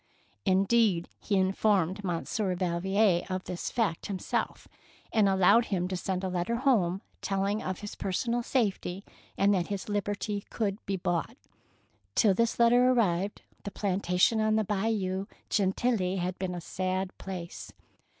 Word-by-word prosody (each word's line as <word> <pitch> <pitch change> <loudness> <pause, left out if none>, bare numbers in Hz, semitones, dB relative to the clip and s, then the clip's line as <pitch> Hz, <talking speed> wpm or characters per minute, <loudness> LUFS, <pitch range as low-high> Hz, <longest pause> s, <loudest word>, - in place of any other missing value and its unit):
Indeed, 195 -1 +3
he 205 - -1
informed 190 0 +2
Monsieur 185 +2 -1
Val 175 -2 -1
vier 190 -1 +3
of 185 0 -2
this 180 - -4
fact 220 -9 -1
himself, 195 -3 -3 0.5
and 210 -3 +4
allowed 190 +5 +5
him 180 -4 -1
to 190 - -2
send 185 +1 -2
a - - 0
letter 180 +5 -1
home 210 -8 +2 0.2
telling 200 +2 0
of 185 -1 -4
his 205 - -6
personal 235 +5 -1
safety, 200 -6 -1 0.3
and 200 +1 +4
that 180 -3 0
his 200 0 -4
liberty 205 0 -2
could 205 -1 -2
be 195 - 0
bought. 175 +7 -2 0.8
Till 210 -4 +5
this 230 +4 +1
letter 240 +1 +5
ar 255 - +4
rived 200 -3 0 0.2
the - - -5
plantation 195 +2 +1
on 215 0 +2
the 220 - +2
Bayou 195 -2 -1 0.2
Gentilly 195 -1 +1
had 180 0 -3
been 180 -1 -2
a 175 - -5
sad 185 +2 -2
place. 180 -3 -7
195 Hz, 150 wpm, -29 LUFS, 185-215 Hz, 0.8 s, allowed